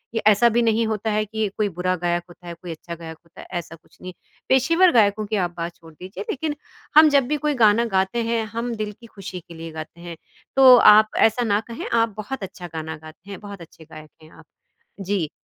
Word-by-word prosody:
ये -, -, 0 dB
ऐसा 215 Hz, +3 st, +5 dB
भी 235 Hz, +1 st, +1 dB
नहीं 225 Hz, 0 st, +1 dB
होता 220 Hz, 0 st, -2 dB
है 215 Hz, 0 st, +1 dB
कि 220 Hz, 0 st, -2 dB
कोई 210 Hz, -1 st, 0 dB
बुरा 185 Hz, +1 st, 0 dB
गायक 175 Hz, 0 st, 0 dB
होता 175 Hz, 0 st, -15 dB
है, 170 Hz, -, -6 dB
कोई 170 Hz, +1 st, -9 dB
अच्छा 170 Hz, +1 st, -8 dB
गायक 160 Hz, -1 st, -10 dB
होता 170 Hz, -, -14 dB
है, -, -, -13 dB
ऐसा 165 Hz, 0 st, -10 dB
कुछ 165 Hz, -, -26 dB
नहीं। 185 Hz, 0 st, -8 dB, 0.4 s
पेशेवर 330 Hz, +8 st, +4 dB
गायकों 210 Hz, 0 st, +3 dB
की -, -, +1 dB
आप 175 Hz, -, -7 dB
बात 170 Hz, 0 st, -5 dB
छोड़ 165 Hz, -1 st, -17 dB
दीजिए, 185 Hz, +4 st, -9 dB
लेकिन 295 Hz, +2 st, -3 dB, 0.4 s
हम 310 Hz, 0 st, +9 dB
जब 275 Hz, -3 st, +3 dB
भी 300 Hz, -, +1 dB
कोई 295 Hz, -, +2 dB
गाना 215 Hz, +2 st, +4 dB
गाते 190 Hz, +5 st, 0 dB
हैं, 230 Hz, -1 st, 0 dB
हम 235 Hz, +1 st, -3 dB
दिल 210 Hz, -, -5 dB
की 240 Hz, -, -15 dB
खुशी 190 Hz, -2 st, -7 dB
के 170 Hz, 0 st, -15 dB
लिए 165 Hz, 0 st, -8 dB
गाते 165 Hz, +2 st, -10 dB
हैं। 170 Hz, -, -7 dB, 0.4 s
तो 265 Hz, -1 st, +7 dB, 0.2 s
आप 215 Hz, +1 st, +5 dB, 0.2 s
ऐसा 235 Hz, +3 st, -2 dB
ना 205 Hz, -, +3 dB
कहें 230 Hz, -, -6 dB, 0.2 s
आप 230 Hz, -2 st, -1 dB
बहुत 245 Hz, +2 st, -6 dB
अच्छा 175 Hz, -1 st, -10 dB
गाना 160 Hz, 0 st, -5 dB
गाते 165 Hz, +5 st, -14 dB
हैं, 195 Hz, -, -8 dB
बहुत 200 Hz, -3 st, -9 dB
अच्छे 160 Hz, -, -17 dB
गायक 155 Hz, -1 st, -13 dB
हैं 155 Hz, -, -17 dB
आप, 165 Hz, -, -17 dB, 0.5 s
जी। 190 Hz, -5 st, -2 dB
200 Hz, 235 wpm, -22 LUFS, 170-230 Hz, 0.5 s, हम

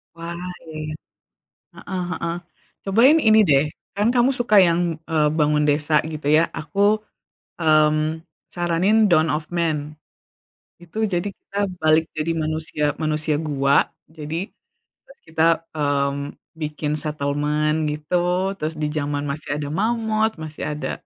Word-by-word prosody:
Wah, 170 Hz, +1 st, -6 dB, 0.3 s
iya 160 Hz, -2 st, -11 dB
iya. 155 Hz, 0 st, -4 dB, 0.8 s
Heeh 185 Hz, -2 st, -5 dB
heeh. 170 Hz, -1 st, -3 dB, 0.5 s
Cobain 235 Hz, +11 st, +5 dB
ini 220 Hz, -3 st, +5 dB
deh, 140 Hz, -5 st, +4 dB, 0.3 s
kan 205 Hz, +3 st, +2 dB
kamu 245 Hz, +1 st, +4 dB
suka 240 Hz, -4 st, +1 dB
yang, 170 Hz, 0 st, +2 dB, 0.3 s
eee, 155 Hz, -2 st, +3 dB
bangun 150 Hz, 0 st, +3 dB
desa 150 Hz, +1 st, +1 dB, 0.2 s
gitu 150 Hz, -2 st, -7 dB
ya, 160 Hz, -, +5 dB
aku, 200 Hz, +7 st, +1 dB, 0.6 s
mmm, 155 Hz, 0 st, +2 dB, 0.3 s
saranin 180 Hz, +6 st, +2 dB
Dawn 155 Hz, -1 st, +4 dB
Of 155 Hz, 0 st, -2 dB
Man. 155 Hz, -3 st, -1 dB, 0.9 s
Itu 175 Hz, +4 st, -13 dB, 0.2 s
jadi 175 Hz, +3 st, 0 dB
kita 200 Hz, -, -11 dB, 0.2 s
balik 155 Hz, +1 st, +4 dB
jadi 155 Hz, +2 st, 0 dB
manusia 155 Hz, -1 st, -2 dB, 0.2 s
manusia 155 Hz, 0 st, 0 dB
gua. 140 Hz, -3 st, +2 dB, 0.3 s
Jadi 160 Hz, +5 st, -4 dB, 0.6 s
terus -, -, -19 dB
kita, 160 Hz, 0 st, 0 dB, 0.3 s
mmm, 140 Hz, -1 st, -1 dB, 0.2 s
bikin 150 Hz, -1 st, -3 dB
settlement 150 Hz, 0 st, -1 dB
gitu. 180 Hz, +5 st, 0 dB
Terus 155 Hz, +1 st, -3 dB
di 150 Hz, -, 0 dB
zaman 145 Hz, -1 st, -2 dB
masih 140 Hz, +1 st, -5 dB
ada 145 Hz, -, -4 dB
mammoth, 220 Hz, +2 st, 0 dB
masih 155 Hz, -1 st, -7 dB
ada, 150 Hz, -, -3 dB
155 Hz, 130 wpm, -22 LUFS, 150-180 Hz, 0.9 s, Cobain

